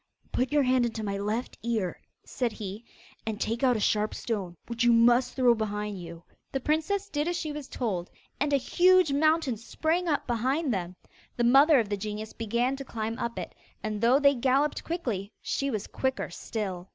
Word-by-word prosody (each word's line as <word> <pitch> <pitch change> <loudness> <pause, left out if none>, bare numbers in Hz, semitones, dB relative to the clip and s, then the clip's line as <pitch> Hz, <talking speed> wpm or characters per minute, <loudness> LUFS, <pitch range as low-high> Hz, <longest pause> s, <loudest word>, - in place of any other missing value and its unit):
'Put 255 +2 0
your 295 -1 +4
hand 255 -1 +3
into 225 -2 -2
my 200 -1 -2
left 215 +4 -3
ear,' 220 -6 -2 0.2
said 240 -3 -2
he, 205 +2 -6 0.4
'and 220 -1 -4
take 230 +1 -1
out 250 -3 +4
a - - -2
sharp 210 +1 +1
stone, 190 -7 -3
which 235 0 -2
you 240 - +5
must 240 +2 +4
throw 250 -2 +5
behind 210 -3 -3
you.' 170 0 -9 0.3
The 270 - -1
princess 320 +9 0
did 300 -4 -1
as 350 0 0
she 310 -3 -3
was 295 -2 -6
told, 190 -8 -3 0.3
and 290 +1 +1
a 280 - +5
huge 360 +3 +4
mountain 310 -4 +2
sprang 320 +10 -1
up 295 -3 0
behind 255 +4 0
them. 180 -2 -3 0.4
The 240 - +1
mother 275 +5 +6
of 225 - 0
the 205 - -1
genius 210 +1 -5
began 235 +4 0
to 275 - -6
climb 225 -3 -4
up 235 0 -3
it, - - -5 0.3
and 215 -1 -3
though 240 +3 +5
they 280 0 +5
galloped 270 +3 +1
quickly, 235 - -3
she 275 - -2
was 215 -6 -2
quicker 265 0 -2
still. 190 -4 -5
240 Hz, 195 wpm, -28 LUFS, 215-280 Hz, 0.4 s, mother